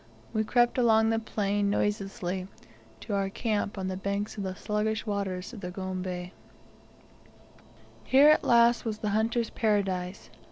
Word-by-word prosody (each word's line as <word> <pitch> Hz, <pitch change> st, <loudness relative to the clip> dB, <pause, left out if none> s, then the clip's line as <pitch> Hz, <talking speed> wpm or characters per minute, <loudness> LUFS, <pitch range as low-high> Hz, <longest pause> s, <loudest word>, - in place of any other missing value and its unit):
We 220 Hz, -, +1 dB
crept 240 Hz, +3 st, +2 dB
along 225 Hz, -2 st, +4 dB
the 225 Hz, -, +1 dB
plain 205 Hz, -2 st, -1 dB
noiselessly 195 Hz, -2 st, -2 dB, 0.5 s
to 215 Hz, -, -5 dB
our 195 Hz, -1 st, 0 dB
camp 210 Hz, -1 st, -2 dB
on 190 Hz, -1 st, -3 dB
the 190 Hz, -, -3 dB
banks 200 Hz, +3 st, -3 dB
of 205 Hz, -, -5 dB
the 190 Hz, -1 st, -4 dB
sluggish 210 Hz, +2 st, -2 dB
waters 200 Hz, -1 st, -3 dB
of 220 Hz, -, -9 dB
the 180 Hz, -, -5 dB
Gombe. 185 Hz, -1 st, -5 dB, 1.7 s
Here 275 Hz, +3 st, +6 dB
at 305 Hz, -, +5 dB
last 235 Hz, 0 st, +4 dB
was 220 Hz, -2 st, -3 dB
the 210 Hz, -, -2 dB
hunter's 225 Hz, +2 st, 0 dB
Paradise! 195 Hz, -4 st, -1 dB
205 Hz, 150 wpm, -28 LUFS, 190-225 Hz, 1.7 s, Here